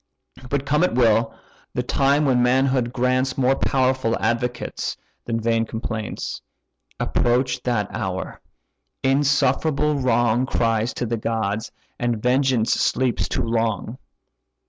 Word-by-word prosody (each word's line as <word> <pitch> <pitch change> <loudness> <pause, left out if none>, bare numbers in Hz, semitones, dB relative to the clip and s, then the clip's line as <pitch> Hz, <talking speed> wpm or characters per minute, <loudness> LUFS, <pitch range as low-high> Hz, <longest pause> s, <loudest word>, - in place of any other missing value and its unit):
But 140 0 -1
come 150 +4 +2
it 180 - +1
will, 115 -2 +3 0.4
the - - 0
time 140 +2 +2
when 130 -3 +3
manhood 130 -1 +2
grants 130 +1 0
More 135 0 +3
powerful 130 -4 +1
advocates 120 +3 -2 0.3
than 115 -1 -1
vain 115 0 +1
complaints. 110 -1 -5 0.6
Approach 125 +1 +1
that 120 -5 0
hour! - - -4 0.6
insufferable 145 +2 +2
wrong 120 0 +2
Cries 115 -2 +1
to - - -2
the 115 0 -2
gods, 110 -1 -2 0.3
and 120 -2 0
vengeance 125 -1 +2
sleeps 130 -1 +1
too - - -1
long. 115 +1 -1
125 Hz, 120 wpm, -22 LUFS, 115-130 Hz, 0.6 s, will